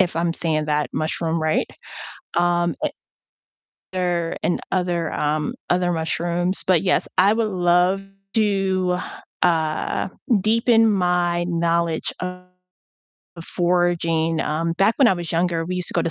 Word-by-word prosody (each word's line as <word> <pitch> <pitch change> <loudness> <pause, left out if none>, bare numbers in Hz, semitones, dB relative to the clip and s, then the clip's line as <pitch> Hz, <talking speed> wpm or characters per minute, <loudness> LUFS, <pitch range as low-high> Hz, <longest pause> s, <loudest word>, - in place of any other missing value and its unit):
if 180 -4 +2
I'm 170 0 +1
saying 155 -2 -1
that 150 0 0
mushroom 160 +1 -1
right, 155 0 +1 0.7
um, 175 -2 +2
and - - 0 1.0
other 175 -2 -1
and 175 - 0
other, 175 -3 0
um, 150 0 -1 0.2
other 180 0 +2
mushrooms, 170 +2 -1
but 185 -3 +3
yes, 185 -2 +1
I 195 +3 +6
would 220 0 0
love 180 0 +2 0.3
to, 195 -4 +1 0.5
uh, 160 -1 +1 0.3
deepen 225 +2 +3
my 175 -2 +1
knowledge 170 -1 0
of 180 0 -5 1.1
foraging. 170 -2 +1
Um, 165 +2 -1
back 195 +6 +2
when 270 -4 +6
I - - +4
was 175 -2 -6
younger, 170 -1 0
we 180 +2 -3
used 180 - -3
to - - -8
go - - +2
to 165 - -1
175 Hz, 140 wpm, -22 LUFS, 165-185 Hz, 1.1 s, I